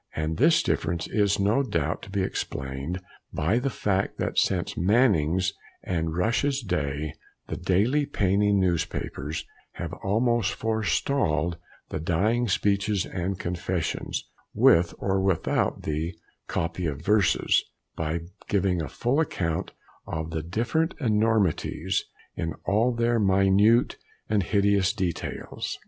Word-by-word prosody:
And 80 Hz, +1 st, -2 dB
this 160 Hz, +5 st, +5 dB
difference 85 Hz, -2 st, -1 dB
is 105 Hz, -1 st, +1 dB
no 105 Hz, +7 st, +3 dB
doubt 85 Hz, -, -1 dB
to -, -, -10 dB
be 95 Hz, -1 st, 0 dB
explained 70 Hz, +2 st, -4 dB, 0.3 s
by 95 Hz, +11 st, +1 dB
the 135 Hz, +2 st, -1 dB
fact 100 Hz, -5 st, -1 dB
that -, -, -2 dB
since 90 Hz, -3 st, +1 dB
Mannings 95 Hz, -, +3 dB, 0.3 s
and 80 Hz, -2 st, -2 dB
Rush's 130 Hz, +8 st, +1 dB
day 75 Hz, -5 st, -2 dB, 0.4 s
the -, -, -2 dB
daily 110 Hz, +11 st, +2 dB
penny 100 Hz, +1 st, +2 dB
newspapers 85 Hz, -5 st, -1 dB, 0.3 s
have -, -, -5 dB
almost 115 Hz, +1 st, +2 dB
forestalled 95 Hz, -, 0 dB, 0.3 s
the -, -, -3 dB
"Dying 105 Hz, +10 st, +1 dB
Speeches 100 Hz, 0 st, +1 dB
and 90 Hz, +1 st, -3 dB
confessions" 85 Hz, -1 st, -3 dB, 0.3 s
with 85 Hz, 0 st, +5 dB
or 95 Hz, -1 st, 0 dB
without 95 Hz, -3 st, 0 dB
the 80 Hz, +3 st, -2 dB, 0.3 s
"copy 85 Hz, +1 st, -2 dB
of 75 Hz, 0 st, -4 dB
verses" 105 Hz, -2 st, +3 dB, 0.3 s
by 80 Hz, +1 st, -2 dB, 0.3 s
giving 95 Hz, -3 st, +1 dB
a 80 Hz, -, -4 dB
full 125 Hz, +5 st, 0 dB
account 85 Hz, -, -1 dB, 0.4 s
of 80 Hz, +1 st, -4 dB
the 80 Hz, -1 st, -2 dB
different 120 Hz, -, -1 dB
enormities 105 Hz, -, +1 dB, 0.3 s
in 80 Hz, -2 st, -3 dB
all 110 Hz, +5 st, +3 dB
their 120 Hz, 0 st, +1 dB
minute 100 Hz, +4 st, +4 dB, 0.3 s
and 105 Hz, -1 st, +2 dB
hideous 100 Hz, 0 st, +2 dB
details. 95 Hz, -6 st, -4 dB
95 Hz, 125 wpm, -26 LUFS, 85-110 Hz, 0.4 s, this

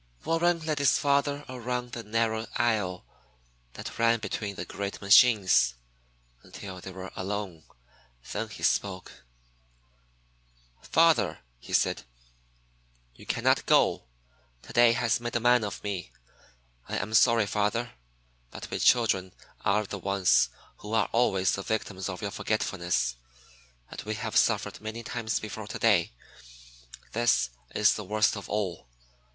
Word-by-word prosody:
Warren 170 Hz, +1 st, +2 dB
led 155 Hz, -2 st, -1 dB
his 140 Hz, -3 st, +4 dB
father 140 Hz, 0 st, +1 dB
around 125 Hz, -1 st, -4 dB
the 120 Hz, -, -5 dB
narrow 110 Hz, 0 st, -1 dB
aisle 105 Hz, -6 st, 0 dB, 0.7 s
that -, -, -8 dB
ran 115 Hz, 0 st, +4 dB
between 105 Hz, -2 st, -4 dB
the -, -, -5 dB
great 100 Hz, 0 st, -5 dB
machines, 100 Hz, -, +5 dB, 0.7 s
until 95 Hz, -2 st, -9 dB
they 95 Hz, -, -8 dB
were 95 Hz, 0 st, -8 dB
alone. 95 Hz, -4 st, -5 dB, 0.7 s
Then 110 Hz, +1 st, -3 dB
he 110 Hz, -, -10 dB
spoke. 95 Hz, -9 st, -1 dB, 1.6 s
"Father," -, -, +3 dB, 0.2 s
he -, -, -12 dB
said, -, -, +2 dB, 1.1 s
"you -, -, -16 dB
cannot -, -, +1 dB
go. -, -, +3 dB, 0.6 s
Today 120 Hz, -1 st, +4 dB
has 115 Hz, -1 st, +1 dB
made 120 Hz, 0 st, -5 dB
a -, -, +3 dB
man 120 Hz, 0 st, +4 dB
of 105 Hz, -, -5 dB
me. 100 Hz, -4 st, -4 dB, 0.8 s
I -, -, -2 dB
am 105 Hz, +4 st, -4 dB
sorry, 115 Hz, 0 st, +5 dB
father, 105 Hz, +4 st, -1 dB, 0.6 s
but -, -, -9 dB
we -, -, -2 dB
children 95 Hz, -6 st, +2 dB, 0.3 s
are 105 Hz, +2 st, +2 dB
the 100 Hz, 0 st, -6 dB
ones 95 Hz, -9 st, +3 dB, 0.3 s
who 105 Hz, +1 st, -8 dB
are 110 Hz, -, +2 dB
always 95 Hz, -6 st, +2 dB
the 100 Hz, -, -2 dB
victims 100 Hz, -2 st, -3 dB
of 95 Hz, +3 st, -6 dB
your 100 Hz, -, -2 dB
forgetfulness, 85 Hz, -, -1 dB, 0.7 s
and -, -, -6 dB
we 110 Hz, +1 st, -4 dB
have 100 Hz, -, -5 dB
suffered -, -, +1 dB
many 110 Hz, +2 st, -6 dB
times 115 Hz, -2 st, -2 dB
before 110 Hz, 0 st, -7 dB
today. 100 Hz, -5 st, +2 dB, 1.0 s
This 115 Hz, -, +2 dB, 0.2 s
is 105 Hz, -, +4 dB
the 105 Hz, -, -5 dB
worst 105 Hz, +3 st, +1 dB
of 100 Hz, -, -8 dB
all. 95 Hz, -10 st, -3 dB
105 Hz, 135 wpm, -28 LUFS, 95-115 Hz, 1.6 s, machines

